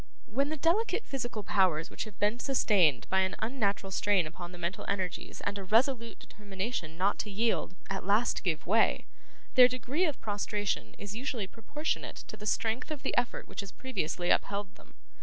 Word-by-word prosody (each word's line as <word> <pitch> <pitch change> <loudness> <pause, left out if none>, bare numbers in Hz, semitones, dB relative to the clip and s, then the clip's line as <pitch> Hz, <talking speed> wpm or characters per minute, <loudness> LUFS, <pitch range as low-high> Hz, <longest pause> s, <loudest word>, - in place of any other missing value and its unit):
When 275 +6 0
the 310 - -2
delicate 410 +10 +2
physical 240 -5 -3
powers 180 -6 +2
which - - -4
have 215 -3 -11
been 210 +4 +1
sustained 200 - +3
by 190 - +4
an 190 0 +1
unnatural 205 -5 -1
strain 195 -2 +3
upon 175 +3 -7
the 180 - -10
mental 175 +2 -3
energies 190 -3 -3
and 205 0 -2
a - - -5
resolute 230 +3 +2
determination 195 -5 -5
not 195 +3 +2
to 210 - -2
yield, 210 -2 0
at 195 -1 -3
last 205 +5 +2
give 165 -5 0
way, 220 +7 +3 0.5
their 250 -2 +9
degree 255 +7 0
of 300 -5 -2
prostration 205 - -2
is 205 0 -6
usually 245 -3 -2
proportionate 235 +10 -3
to - - -6
the 210 - -7
strength 225 +6 0
of 305 -3 -5
the - - -1
effort 245 0 0
which - - -9
has 200 -2 -4
previously 185 -8 -1
upheld 200 -1 0
them. - - -20
205 Hz, 180 wpm, -31 LUFS, 190-245 Hz, 0.5 s, their